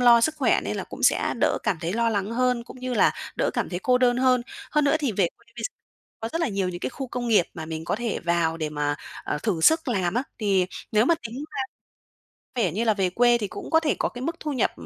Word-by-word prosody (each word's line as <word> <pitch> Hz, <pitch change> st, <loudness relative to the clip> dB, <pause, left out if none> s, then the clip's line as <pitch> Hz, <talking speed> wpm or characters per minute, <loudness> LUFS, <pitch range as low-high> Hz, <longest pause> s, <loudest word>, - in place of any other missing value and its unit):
lo 240 Hz, -1 st, +7 dB
sức 310 Hz, +6 st, +2 dB
khỏe 275 Hz, -, +3 dB
nên -, -, -2 dB
là -, -, -3 dB
cũng -, -, -9 dB
sẽ -, -, +3 dB
đỡ -, -, +3 dB
cảm 190 Hz, -, +1 dB
thấy 170 Hz, +2 st, -2 dB
lo 235 Hz, +1 st, +2 dB
lắng 200 Hz, -1 st, -1 dB
hơn, 250 Hz, -1 st, +1 dB
cũng 250 Hz, -, -12 dB
như 255 Hz, -1 st, -2 dB
là -, -, +4 dB, 0.2 s
đỡ -, -, +1 dB
cảm -, -, -1 dB
thấy 175 Hz, -, -2 dB
cô 250 Hz, -1 st, +3 dB
đơn 245 Hz, -1 st, +3 dB
hơn. 255 Hz, -1 st, +3 dB, 0.3 s
Hơn 300 Hz, -1 st, +2 dB
nữa 285 Hz, -, +4 dB
thì 275 Hz, -7 st, 0 dB
về 185 Hz, -3 st, +2 dB
quê -, -, -27 dB
bây 230 Hz, -, -6 dB
gi -, -, -2 dB, 0.5 s
có 225 Hz, -, -3 dB
rất 330 Hz, -, -1 dB
là 330 Hz, -, +1 dB
nhiều 195 Hz, -3 st, -1 dB
những 175 Hz, -1 st, -5 dB
cái -, -, -2 dB
khu 265 Hz, +2 st, -5 dB
công 240 Hz, -1 st, -3 dB
nghiệp 210 Hz, -6 st, +5 dB
mà 160 Hz, -3 st, -6 dB
mình 160 Hz, 0 st, -5 dB
có -, -, -1 dB
thể 235 Hz, -1 st, -2 dB
vào 170 Hz, -1 st, +1 dB
để 155 Hz, -2 st, -2 dB
mà, 145 Hz, -1 st, -1 dB, 0.3 s
ờ, -, -, -2 dB
thử 195 Hz, -7 st, 0 dB
sức 320 Hz, -, +4 dB
làm 190 Hz, -6 st, 0 dB
á, 245 Hz, -, +2 dB, 0.2 s
thì 195 Hz, -5 st, +2 dB, 0.3 s
nếu 215 Hz, +2 st, +5 dB
mà 335 Hz, -, +5 dB
tính 225 Hz, -, -9 dB, 0.2 s
ra 265 Hz, -, 0 dB, 1.0 s
vẻ 180 Hz, -, +1 dB
như 220 Hz, +6 st, 0 dB
là 220 Hz, -, +3 dB
về 190 Hz, -3 st, +1 dB
quê 240 Hz, +4 st, +4 dB
thì 205 Hz, -3 st, -3 dB
cũng -, -, -8 dB
có 320 Hz, -, +5 dB
thể 310 Hz, -3 st, 0 dB
có -, -, +1 dB
cái 245 Hz, -, -8 dB
mức 330 Hz, +4 st, -2 dB
thu 300 Hz, -, -3 dB
nhập 255 Hz, -6 st, +1 dB
230 Hz, 280 wpm, -25 LUFS, 185-255 Hz, 1.0 s, lo